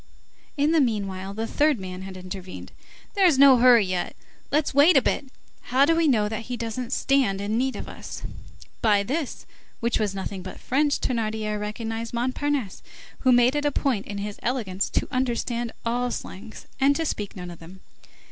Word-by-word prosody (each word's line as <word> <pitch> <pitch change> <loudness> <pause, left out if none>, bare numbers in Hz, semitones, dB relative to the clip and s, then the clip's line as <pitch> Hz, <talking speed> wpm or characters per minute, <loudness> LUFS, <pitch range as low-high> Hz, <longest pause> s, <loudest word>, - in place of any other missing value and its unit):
In 290 +2 +3
the 325 -2 +4
meanwhile, 195 -6 -1
the 225 +1 -2
third 295 +1 +2
man 185 -1 -7
had 190 0 -8
intervened. 185 0 -8 0.4
"There's 370 -8 +4
no 275 -1 +8
hurry 240 -3 +6
yet, 185 -1 -2 0.4
let's 295 0 +1
wait 290 +4 +6
a - - +6
bit. 285 - 0 0.4
How 260 +3 +4
do 330 +2 +3
we 330 -1 +3
know 220 -7 +3
that 220 +1 -4
he 250 -1 -4
doesn't 235 +2 -4
stand 265 -9 +2
in 205 +2 -2
need 260 +2 0
of - - -6
us?" - - -8 0.6
By 205 -3 +4
this, 280 +6 -3 0.3
which 235 -1 0
was 205 -3 -1
nothing 190 0 -5
but 185 - -9
French, 285 +3 +1
Thénardier 215 -3 -2
recognized 225 +2 -4
Montparnasse, 255 -2 -1 0.4
who 255 - +3
made 245 +2 +5
it 295 - 0
a 290 - +2
point 260 -8 -1
in 205 - -5
his 205 0 -5
elegance 210 -7 -1
to - - -1
understand 240 -2 -1
all 245 +2 0
slangs 215 -2 -8
and 275 +1 +4
to 325 - -1
speak 205 -9 -3
none 180 -2 -7
of 170 - -11
them. 180 +3 -13
235 Hz, 185 wpm, -25 LUFS, 200-270 Hz, 0.6 s, no